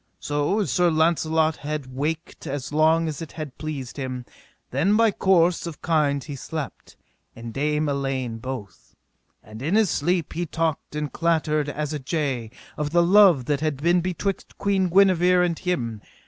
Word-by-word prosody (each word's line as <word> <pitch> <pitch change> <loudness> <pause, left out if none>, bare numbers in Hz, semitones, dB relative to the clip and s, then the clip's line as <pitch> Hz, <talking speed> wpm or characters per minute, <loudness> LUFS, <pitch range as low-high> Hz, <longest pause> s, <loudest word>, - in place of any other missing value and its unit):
So 145 +8 0
as 200 - -1
Sir 175 -1 +3
Launcelot 160 -1 +2
had 145 -3 -5
waked 155 +4 -4
as 140 +1 -4
long 160 +2 +3
as 155 -2 -4
it 160 - -8
had 155 -5 -7
pleased 145 -5 -5
him, 130 -2 -4 0.5
then 200 +5 +2
by 225 -1 +4
course 180 -3 +2
of 165 - -9
kind 145 -4 +1
he 145 - -7
slept, 150 +1 -7 0.4
and 115 0 -8
Dame 150 +2 0
Elaine 135 -4 -2
both. 115 -7 -8 0.5
And 110 +1 -11
in 160 +8 0
his 220 -5 +3
sleep 170 +1 0
he 175 +1 -2
talked 160 -2 -2
and 150 -1 -3
clattered 155 -3 +1
as 150 +1 -3
a 150 - -3
jay, 135 -5 -2 0.3
of 150 -1 -1
the 170 +2 +3
love 180 -7 +6
that 145 0 0
had 155 -2 -1
been 170 +5 +2
betwixt 185 +2 -3
Queen 195 -2 +1
Guenever 180 -1 +4
and 170 -2 -1
him. 120 - -2
155 Hz, 170 wpm, -24 LUFS, 140-170 Hz, 0.5 s, love